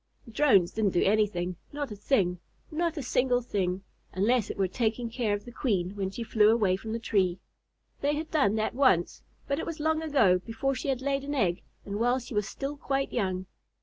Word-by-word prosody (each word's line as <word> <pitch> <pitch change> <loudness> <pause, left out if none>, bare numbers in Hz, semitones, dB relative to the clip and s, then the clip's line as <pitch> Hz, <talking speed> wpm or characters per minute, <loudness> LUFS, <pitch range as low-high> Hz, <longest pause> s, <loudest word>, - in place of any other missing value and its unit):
The 230 - -12
Drones 210 -9 +4
didn't 210 -3 0
do 175 - +4
anything, 190 -4 +1
not 290 -4 -4
a - - -5
thing, 195 -5 +1 0.3
not 335 +1 -1
a 290 - -3
single 250 0 +2
thing, 190 -4 -1 0.3
unless 220 +3 +2
it - - -5
were 195 -1 +2
taking 230 +3 -1
care 220 -4 0
of 205 - -8
the 240 - -9
Queen 200 -7 -1
when 195 -2 -2
she 230 +5 -5
flew 215 -2 +4
away 210 -5 +3
from 220 +3 -6
the 230 - -1
tree. 195 -6 +1 0.6
They 290 +1 +1
had 315 +2 -5
done 220 -10 +3
that 220 0 0
once, 245 -11 +2 0.3
but 280 +2 0
it - - -3
was 330 -2 -5
long 315 +1 +1
ago, 265 -13 +3
before 230 +7 -2
she 270 - -5
had 260 -1 -1
laid 275 0 0
an 285 +1 -3
egg 180 -9 +1 0.2
and 200 +1 -4
while 245 +2 +3
she 245 -1 -7
was 210 -2 0
still 275 +7 -5
quite 275 -1 -2
young. 185 -5 -1
225 Hz, 215 wpm, -28 LUFS, 195-275 Hz, 0.6 s, Drones